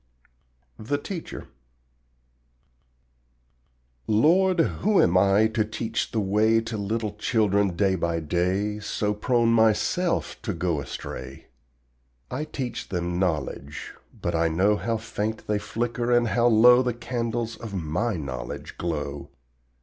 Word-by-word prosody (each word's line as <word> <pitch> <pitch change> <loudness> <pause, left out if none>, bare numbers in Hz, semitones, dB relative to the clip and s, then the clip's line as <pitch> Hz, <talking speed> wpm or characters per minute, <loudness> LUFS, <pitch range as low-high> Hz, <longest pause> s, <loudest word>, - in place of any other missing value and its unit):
THE 130 +7 -1
TEACHER 170 +3 -7 2.6
Lord, 175 - +4
who 200 +4 +2
am 90 - +4
I 100 +3 +5
to 110 0 +1
teach 110 +1 -3
the 110 - -1
way 105 +3 +3
To 115 0 -5
little 105 +1 -2
children 100 -4 +1
day 95 +1 +2
by 85 -2 -1
day, 90 +6 -1
So 105 0 -1
prone 115 +2 +1
myself 115 - +1
to 105 - -3
go 85 -3 -1
astray? 65 0 -8 0.8
I 140 +5 -2
teach 125 -6 -5
them 90 -1 -2
KNOWLEDGE, 75 -4 -3 0.3
but - - -2
I 85 0 +2
know 95 +6 +2
How 115 +2 -1
faint 110 0 -4
they 105 -1 0
flicker 120 +3 -2
and 120 -1 +3
how 120 +1 +3
low 120 +2 +7
The 125 -2 -1
candles 115 -1 -3
of 110 -4 -7
my 90 +6 -1
knowledge 65 -5 -6
glow. 75 -4 -3
105 Hz, 125 wpm, -25 LUFS, 90-120 Hz, 2.6 s, low